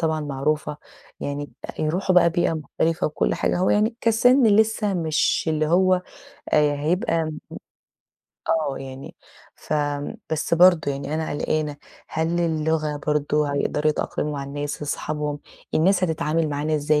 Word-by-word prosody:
طبعًا 160 -1 0
معروفة، 150 +1 -2 0.4
يعني 145 0 -4 0.3
يروحوا 180 +5 0
بقى 170 -1 +6
بيئة 170 0 +1
مختلفة 160 +1 -1
وكل 150 - 0
حاجة - - 0
هو 185 - +2
يعني 215 +3 +2
كسِن 245 +4 +4
لسّه 215 -1 +3
مش 160 -4 +1
اللي 155 -1 +1
هو 185 +2 +3 0.5
آآ 150 -1 +4
هيبقى 165 +3 0
م 155 -1 -5 1.1
آه 155 -4 0
يعني 135 0 -9 0.4
فم 145 -1 -2 0.2
بس 160 +2 0
برضه 175 -3 +5
يعني 140 +2 -4
أنا 160 0 -2
قلقانة، 150 0 -1 0.3
هل 165 +2 -1
اللغة 160 -2 0
برضه 150 0 +1
هيقدروا 150 +2 +1
يتأقلموا 150 0 -2
مع 140 -1 -4
الناس 145 +1 -5
اصحابهم؟ 150 0 -3 0.4
الناس 185 +3 +3
هتتعامل 160 -1 0
معانا 150 +2 -1
إزاي 150 0 +2
155 Hz, 140 wpm, -23 LUFS, 150-170 Hz, 1.1 s, بقى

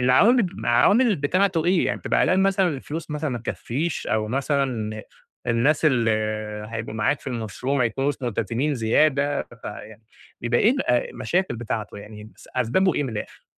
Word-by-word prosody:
العوامل 190 - +5
العوامل 205 - +4
بتاعته 170 +3 +1
إيه؟ 180 0 +3
يعني - - -1
بتبقى - - +1
قلقان 190 +1 +3
مثلًا 195 -1 +3
الفلوس 155 +2 -5
مثلًا 150 -1 -2
ما 120 - -3
تكفيش، 135 +7 -3
أو 110 -1 0
مثلًا 125 -5 -1 0.4
الناس 135 +7 +2
اللي 120 -6 +3 0.6
هيبقوا 115 -1 -5
معاك 110 +6 0
في - - -19
المشروع 125 +2 -3
ما 125 - +3
يكونوش 135 +5 0
ملتزمين 120 +5 -1
زيادة، 140 +5 +2 0.2
فيع 105 +1 -8 0.4
بيبقى 120 0 +1
إيه 215 - +5
ال 270 +1 0
المشاكل 125 +4 0
بتاعته 110 -3 -4
يعني 105 +1 -10
بس - - -16
أسبابُه 155 +9 +2
إيه - - +1
من - - -3
الآخر؟ 105 - -7
130 Hz, 160 wpm, -24 LUFS, 115-160 Hz, 0.6 s, العوامل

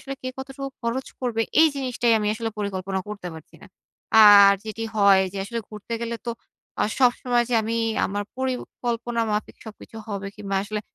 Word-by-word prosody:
আসলে 275 - -6
কে 255 - -3
কতটুকু 270 +1 -6
খরচ 235 +3 -2
করবে, 235 -3 0 0.2
এই 320 - +7
জিনিসটাই 250 -3 0
আমি 210 - -2
আসলে 225 0 -3
পরিকল্পনা 190 -2 -3
করতে 200 -4 -6
পারছি 160 0 -13
না। - - -12 0.6
আর 200 -1 +9
যেটি 220 +1 -6
হয় 200 -2 +6
যে, 200 - -8
আসলে 230 +3 -4
ঘুরতে 215 +2 -9
গেলে 235 0 -3
তো 235 - 0 0.5
আ - - +3
সবসময় 245 -1 +2
যে 245 - 0
আমি 225 +2 -2 0.3
আমার 205 +1 -3
পরিকল্পনা 240 -2 -3
মাফিক 210 0 -3
সবকিছু 220 +1 -11
হবে, 200 -1 -4
কিংবা 200 -2 -3
আসলে 210 0 -4
225 Hz, 175 wpm, -24 LUFS, 205-245 Hz, 0.6 s, আর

